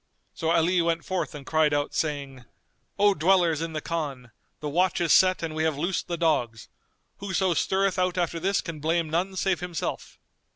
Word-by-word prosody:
So 160 - -2
Ali 170 +2 +3
went 165 0 -1
forth 185 -4 -3
and 140 -2 -9
cried 155 -2 +2
out, 145 0 -1
saying, 140 -5 -3 0.5
"O 205 0 +4
dwellers 170 -2 +2
in 165 -1 -4
the 155 - -3
Khan, 140 -8 -4 0.3
the 150 - -5
watch 175 +4 +1
is 170 -2 +3
set 185 -2 +4
and 160 -1 -3
we 155 - -2
have 160 -3 0
loosed 175 +5 -2
the 170 - -3
dogs; 125 -9 0 0.5
whoso 190 -2 0
stirreth 190 +3 +1
out 180 0 0
after 170 -1 -1
this 195 +3 +1
can 165 -3 -7
blame 160 +1 0
none 185 +4 -1
save 190 -1 0
himself." 180 -3 -5
165 Hz, 190 wpm, -26 LUFS, 155-185 Hz, 0.5 s, O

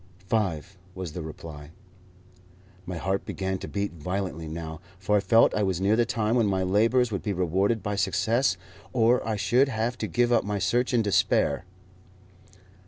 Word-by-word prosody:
"Five," 95 -3 -2 0.2
was 90 -4 -5
the 90 - -6
reply. 75 -1 -9 1.2
My 90 -1 -4
heart 95 +3 -1
began 95 0 -3
to - - -7
beat 100 -2 -3
violently 90 0 -4
now, 80 -1 -6 0.2
for 100 +3 0
I - - +3
felt 115 +4 +4
I 105 - 0
was 95 -3 0
near 100 +3 +3
the 120 0 +2
time 110 0 0
when 115 -4 +3
my 95 -1 +1
labours 115 +6 +2
would 100 - -2
be 105 - -2
rewarded 95 +5 0
by 105 0 -2
success, 105 +3 +1 0.4
or 120 0 +3
I 110 - 0
should 120 +7 +3
have 120 0 -2
to - - -2
give 120 0 +1
up - - +3
my 105 0 -2
search 120 +6 +1
in 120 -3 +2
despair. 100 -3 +2
100 Hz, 175 wpm, -26 LUFS, 90-115 Hz, 1.2 s, felt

